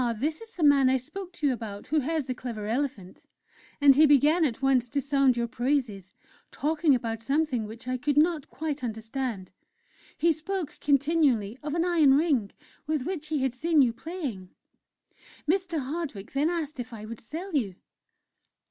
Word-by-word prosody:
this 305 - -2
is 455 0 -11
the 345 - -3
man 280 -3 +6
I 265 - +3
spoke 370 +9 -8
to 300 - -4
you 275 - +3
about, 215 -4 -7
who 310 - +3
has 305 +1 -1
the 255 - -2
clever 235 -4 -6
elephant,' 225 -5 -3 0.5
And 285 -2 +7
he 305 +2 +7
began 295 +4 +4
at 240 -6 -2
once 265 -3 +2
to 285 - -1
sound 275 -2 +2
your 235 0 0
praises, 240 -6 -2 0.3
talking 305 -1 +2
about 230 -2 -3
something 270 -3 0
which 225 +3 -10
I 255 0 -1
could 290 +3 -1
not 315 -1 +2
quite 300 -3 -4
understand; 225 -3 -4 0.7
he 335 - +3
spoke 325 0 -4
continually 280 -6 +2
of 295 +1 -3
an 340 0 +1
'iron 320 -6 +5
ring' 285 -10 +1 0.4
with 305 -4 -1
which 340 -5 -4
he 305 -3 -1
had 265 -2 0
seen 305 +3 +3
you 235 -2 +1
playing.... 260 - -6 1.0
"Mr. 350 -1 0
Hardwick 275 - -5
then 285 +4 +1
asked 315 -5 -3
if 245 0 -6
I 215 -1 -8
would 230 +1 -8
sell 335 - -7
you. 205 -10 0
275 Hz, 175 wpm, -27 LUFS, 240-315 Hz, 1.0 s, And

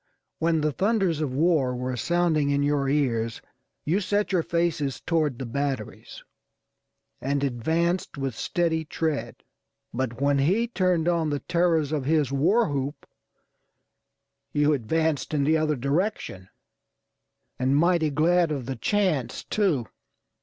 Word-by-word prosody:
When 165 -1 +1
the 155 0 +1
thunders 190 -3 +1
of 145 -4 -1
war 140 -3 +2
were 125 +1 -3
sounding 160 +1 +1
in 140 0 +1
your 145 -1 +1
ears 115 -6 0 0.5
you 175 +6 +2
set 205 +1 0
your 180 -3 +2
faces 165 -5 -1
toward 155 -6 0
the 130 - -5
batteries, 135 -2 -4 1.0
and 140 +1 -1
advanced 160 +8 -1
with 135 -2 -2
steady 165 +4 0
tread; 155 -1 -3 0.5
but 120 -1 -3
when 140 0 +2
he 195 +12 +2
turned 185 -7 +1
on 170 -3 +1
the 145 -1 -2
terrors 170 -4 +1
of 145 -4 -1
his 150 -3 +2
war 190 - +3
whoop 140 0 -3 1.5
you 150 +1 +3
advanced 155 +4 -1
in 140 - +2
the 155 +3 +3
other 155 -1 +1
direction, 140 - -2 1.1
and 130 +2 +2
mighty 170 -1 +3
glad 165 +3 +2
of 135 -5 -3
the 135 +1 -4
chance, 180 - 0
too. 180 - 0
150 Hz, 135 wpm, -25 LUFS, 135-170 Hz, 1.5 s, war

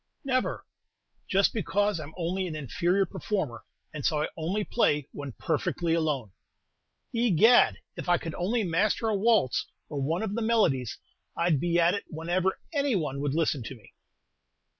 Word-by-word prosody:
"Never." 255 -2 -1 0.6
"Just 195 +1 +3
because 205 -1 0
I'm 155 0 -8
only 185 +2 -1
an 160 - -5
inferior 175 - +1
performer, 165 - -3 0.3
and 150 -2 -5
so 150 +1 +1
I - - -2
only 180 +7 -1
play 150 - +1
when 140 -3 -7
perfectly 170 +7 -1
alone." 150 - 0 0.8
"Egad, 230 0 +5 0.2
if - - -5
I 175 - +5
could 165 -2 -6
only 215 +6 0
master 205 +5 +1
a 215 - +1
waltz, 210 - +2 0.2
or 145 -2 -3
one 165 +8 0
of 210 -2 -2
the 230 - -2
melodies, 190 - +1 0.4
I'd 170 -4 +2
be 170 +2 +1
at 170 +1 +4
it 200 - -3
whenever 175 +4 -1 0.2
any 280 -5 +1
one 150 -6 -2
would 145 0 -1
listen 155 -4 +1
to 120 +4 -7
me." 110 -5 -19
175 Hz, 160 wpm, -28 LUFS, 150-205 Hz, 0.8 s, Egad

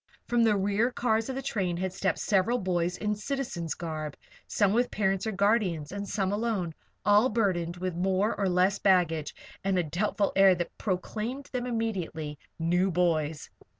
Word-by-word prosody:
From 240 -1 +2
the 220 -3 +4
rear 205 +4 +1
cars 225 -2 0
of 260 - -3
the 270 - -4
train 185 -9 -1
had 185 0 -2
stepped 190 -2 0
several 205 +4 +2
boys 180 -4 -1
in 210 0 -1
citizen's 210 - -3
garb, 155 -3 -5 0.3
some 205 -2 +2
with 245 +2 +2
parents 195 0 0
or - - 0
guardians 200 -7 +1
and 200 0 -5
some 195 -2 0
alone, 215 -2 0
and 165 - -7 0.3
all 210 +5 +5
burdened 180 -7 0
with 185 0 -3
more 190 +4 +1
or 195 -2 0
less 185 +2 +2
baggage 170 -6 +2 0.3
and 195 -1 +1
a 180 - +2
doubtful 200 +5 0
air 195 -1 +6
that 175 0 -4
proclaimed 220 +7 -3
them 250 -1 -2
immediately 180 - -3 0.2
"new 175 +3 +2
boys." 160 -4 0
195 Hz, 175 wpm, -28 LUFS, 175-215 Hz, 0.3 s, air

